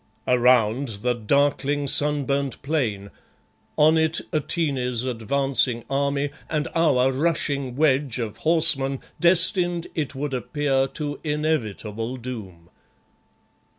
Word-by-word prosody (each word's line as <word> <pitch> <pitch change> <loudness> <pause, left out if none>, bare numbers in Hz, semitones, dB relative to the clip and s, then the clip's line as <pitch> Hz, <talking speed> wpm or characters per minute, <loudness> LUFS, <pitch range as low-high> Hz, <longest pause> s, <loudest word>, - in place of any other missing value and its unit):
Around 125 0 +2 0.2
the 125 0 +1
darkling, 140 +4 0
sunburnt 140 -2 +3
plain. 115 -10 -2 0.7
On 155 +2 +4
it 160 +1 +1
Atene's 135 -6 -1
advancing 130 0 0
army, 140 +1 -1 0.2
and 155 -1 -2
our 135 -6 +2
rushing 140 -3 -2
wedge 140 -3 +1
of 115 -4 -5
horsemen 155 -5 +2 0.2
destined, 175 0 +4
it 150 -4 -4
would 140 +1 -4
appear, 135 +1 -1
to 145 +1 -6
inevitable 125 -7 -3
doom. 100 -9 -9
140 Hz, 100 wpm, -23 LUFS, 125-150 Hz, 0.7 s, On